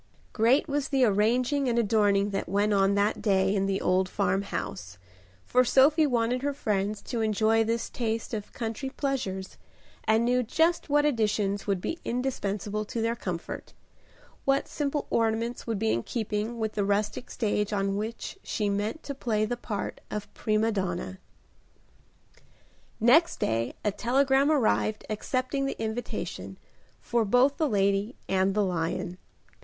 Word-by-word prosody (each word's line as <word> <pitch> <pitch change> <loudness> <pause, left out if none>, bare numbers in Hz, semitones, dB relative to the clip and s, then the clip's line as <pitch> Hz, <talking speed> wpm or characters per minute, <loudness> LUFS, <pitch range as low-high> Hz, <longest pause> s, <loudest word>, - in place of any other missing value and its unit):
Great 240 +7 +3
was 285 -2 -1
the 270 -3 +3
arranging 245 +6 +2
and 235 - 0
adorning 205 -3 +3
that 195 -3 -3
went 205 +2 +2
on 195 0 +3
that 205 +1 +1
day 190 -2 +2
in 195 -1 +1
the 195 0 0
old 185 0 +1
farmhouse, 180 - -2 0.5
for 250 0 +4
Sophie 290 +5 +5
wanted 245 -1 +1
her 285 0 -1
friends 205 -3 -1
to 235 -3 -3
enjoy 220 +1 +3
this 230 +1 -1
taste 225 -1 -3
of 210 -2 -4
country 230 +3 -4
pleasures, 255 -10 -3 0.5
and 220 +2 +3
knew 250 +1 +3
just 320 +8 +1
what 295 +1 +3
additions 210 -6 0
would 195 -2 +1
be 330 - -4
indispensable 215 -5 -2
to 220 +2 -5
their 230 +1 0
comfort; 180 -7 -6 0.7
what 275 0 +2
simple 290 -1 -2
ornaments 230 +2 0
would 225 -2 -1
be 220 +2 +1
in 115 - +1
keeping 220 - -3
with 220 -1 -1
the 205 - -1
rustic 205 +4 -1
stage 210 -2 -1
on 195 -1 0
which 225 - -5
she 210 -3 -2
meant 205 +9 -2
to 280 - -4
play 220 -5 0
the 245 +3 -2
part 220 -4 -5
of 210 -1 -5
prima 215 +1 +1
donna. 190 -2 -3 1.8
Next 285 +10 +4
day 115 +2 -1
a 210 - +3
telegram 270 +6 +2
arrived 220 -6 +1
accepting 255 +5 -1
the - - -4
invitation, 225 +2 -4 0.4
for 235 -1 0
both 250 +6 +3
the 310 -3 +1
lady 200 +2 +1
and 190 +1 +1
the 210 -1 +3
lion. 175 0 -2
220 Hz, 150 wpm, -28 LUFS, 200-250 Hz, 1.8 s, Sophie